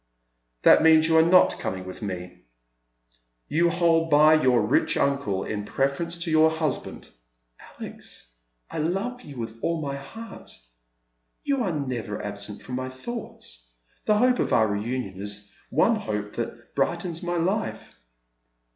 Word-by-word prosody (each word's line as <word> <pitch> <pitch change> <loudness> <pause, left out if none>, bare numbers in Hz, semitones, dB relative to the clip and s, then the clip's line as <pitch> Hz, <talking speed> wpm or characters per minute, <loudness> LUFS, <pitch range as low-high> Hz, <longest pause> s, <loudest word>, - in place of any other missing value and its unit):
" - - -49
That - - +7
means 160 0 +6
you 165 - +3
are - - +8
not 180 +3 +5
coming 95 -1 -4
with 95 - -8
me. 90 - -6 1.0
You 170 +3 +2
hold 165 -1 +2
by 155 +1 +6
your 130 -6 +4
rich 105 - +2
uncle 140 -9 0
in 105 -1 -4
pi'eference 140 +9 -1
to 170 - -3
your 160 0 +5
husband." 160 -4 -3 0.3
" - - -47 0.2
Alex, - - -9 0.4
I - - -4
love 195 +11 -2
you 145 - -11
with 115 -1 -6
all 165 -1 0
my 140 -2 -3
heart. 225 +11 -10 0.9
You 275 -3 0
are 190 - 0
never 120 -6 -4
absent 105 0 -6
from 125 0 -5
my 130 0 -3
thoughts; 130 - -8 0.4
the 210 - +3
hope 250 +2 +3
of - - 0
our 110 - +4
reunion 105 -2 -3
is 100 0 -6
the 100 - -26 0.2
one 195 - +3
hope 105 - -4
that 120 0 -6
brightens 170 +4 -1
my 175 0 -2
life." 190 +6 -2
140 Hz, 155 wpm, -25 LUFS, 105-170 Hz, 1.0 s, are